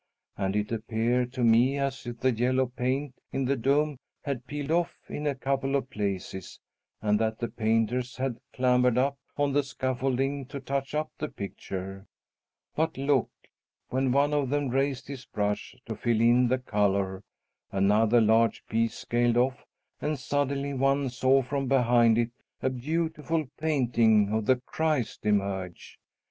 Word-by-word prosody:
And 95 Hz, 0 st, -1 dB
it 105 Hz, +1 st, -1 dB
appeared 115 Hz, +2 st, 0 dB
to 125 Hz, -2 st, -2 dB
me 120 Hz, +4 st, +4 dB
as 135 Hz, -3 st, -2 dB
if 120 Hz, -1 st, -6 dB
the 130 Hz, -, +3 dB
yellow 125 Hz, +3 st, +2 dB
paint 130 Hz, +3 st, -2 dB, 0.2 s
in 135 Hz, 0 st, -1 dB
the 140 Hz, +2 st, +2 dB
dome 140 Hz, +3 st, +1 dB, 0.3 s
had 130 Hz, -3 st, -4 dB
peeled 145 Hz, +1 st, -4 dB
off 170 Hz, +1 st, +1 dB
in 150 Hz, 0 st, -4 dB
a 140 Hz, -, 0 dB
couple 135 Hz, +1 st, -1 dB
of 135 Hz, -1 st, -1 dB
places 95 Hz, -2 st, -4 dB, 0.4 s
and 105 Hz, 0 st, +2 dB
that 110 Hz, 0 st, 0 dB
the 120 Hz, -, -2 dB
painters 115 Hz, +3 st, 0 dB
had 130 Hz, -3 st, -2 dB
clambered 125 Hz, -1 st, +3 dB
up 140 Hz, +2 st, +1 dB, 0.2 s
on 145 Hz, -1 st, +1 dB
the 145 Hz, -, +4 dB
scaffolding 135 Hz, 0 st, -1 dB
to 140 Hz, +1 st, -6 dB
touch 135 Hz, +1 st, -3 dB
up 155 Hz, 0 st, -1 dB
the 155 Hz, -, -3 dB
picture. 95 Hz, 0 st, -6 dB, 0.7 s
But, 160 Hz, -2 st, 0 dB
look! 135 Hz, -2 st, +2 dB, 0.6 s
when 130 Hz, 0 st, +1 dB
one 140 Hz, +3 st, +3 dB
of 145 Hz, -3 st, +1 dB
them 145 Hz, -1 st, 0 dB
raised 135 Hz, +1 st, 0 dB
his 135 Hz, -2 st, -7 dB
brush 105 Hz, +3 st, -2 dB
to 110 Hz, -, -4 dB
fill 115 Hz, +1 st, 0 dB
in 120 Hz, +2 st, +5 dB
the 130 Hz, +2 st, +2 dB
color, 100 Hz, -5 st, 0 dB, 0.5 s
another 105 Hz, +4 st, +4 dB
large 115 Hz, +1 st, +3 dB
piece 115 Hz, +1 st, 0 dB
scaled 120 Hz, 0 st, +1 dB
off, 125 Hz, +1 st, +1 dB, 0.4 s
and 150 Hz, 0 st, -1 dB
suddenly 140 Hz, +1 st, -1 dB
one 135 Hz, +1 st, +1 dB
saw 130 Hz, +2 st, +3 dB
from 135 Hz, +1 st, -2 dB
behind 120 Hz, -3 st, +4 dB
it 120 Hz, 0 st, +1 dB, 0.3 s
a 130 Hz, -, +2 dB
beautiful 160 Hz, +4 st, -1 dB
painting 115 Hz, -9 st, +3 dB
of 110 Hz, -1 st, -1 dB
the 130 Hz, -, +6 dB
Christ 130 Hz, -2 st, -2 dB
emerge. 95 Hz, -3 st, -2 dB
125 Hz, 155 wpm, -28 LUFS, 115-140 Hz, 0.7 s, the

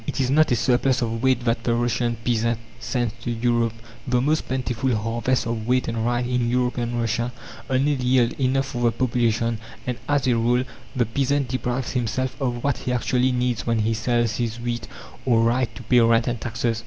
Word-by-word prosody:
It -, -, -3 dB
is 130 Hz, -1 st, +1 dB
not 155 Hz, +1 st, +4 dB
a -, -, +5 dB
surplus 125 Hz, +1 st, +2 dB
of 115 Hz, -1 st, -2 dB
wheat 130 Hz, -2 st, +2 dB
that 115 Hz, -1 st, 0 dB
the 115 Hz, +2 st, +1 dB
Russian 120 Hz, 0 st, 0 dB
peasant 115 Hz, -1 st, +1 dB, 0.2 s
sends 120 Hz, -2 st, -1 dB
to -, -, -4 dB
Europe. 120 Hz, -1 st, +1 dB, 0.3 s
The 125 Hz, -1 st, +2 dB
most 150 Hz, +5 st, +1 dB
plentiful 130 Hz, -1 st, -1 dB
harvests 115 Hz, +3 st, 0 dB
of 115 Hz, -1 st, -3 dB
wheat 125 Hz, +1 st, +2 dB
and 115 Hz, -1 st, -2 dB
rye 120 Hz, +1 st, +1 dB
in 125 Hz, -1 st, 0 dB
European 120 Hz, -1 st, 0 dB
Russia 120 Hz, +1 st, -1 dB, 0.4 s
only 135 Hz, +3 st, +2 dB
yield 125 Hz, -3 st, +2 dB
enough 135 Hz, +1 st, +2 dB
for 125 Hz, -3 st, -5 dB
the 120 Hz, -, +4 dB
population. 115 Hz, -2 st, 0 dB, 0.3 s
And 125 Hz, -1 st, -3 dB
as 145 Hz, -2 st, +2 dB
a 125 Hz, -, +3 dB
rule, 120 Hz, +2 st, +2 dB, 0.3 s
the 125 Hz, -2 st, +2 dB
peasant 135 Hz, +3 st, 0 dB
deprives 125 Hz, -1 st, -2 dB
himself 125 Hz, +1 st, -1 dB
of 120 Hz, -2 st, -1 dB
what 140 Hz, -2 st, 0 dB
he 125 Hz, -, -3 dB
actually 125 Hz, +1 st, +1 dB
needs 125 Hz, -2 st, -1 dB
when 115 Hz, -1 st, +2 dB
he 110 Hz, +1 st, +1 dB
sells 120 Hz, 0 st, 0 dB
his 115 Hz, -1 st, -2 dB
wheat 120 Hz, 0 st, -3 dB, 0.4 s
or 115 Hz, -3 st, +3 dB
rye 120 Hz, +3 st, +2 dB
to 120 Hz, -, -11 dB
pay 125 Hz, +2 st, +4 dB
rent 115 Hz, 0 st, +4 dB
and 120 Hz, -2 st, -2 dB
taxes. 115 Hz, 0 st, -1 dB
120 Hz, 200 wpm, -23 LUFS, 115-125 Hz, 0.4 s, a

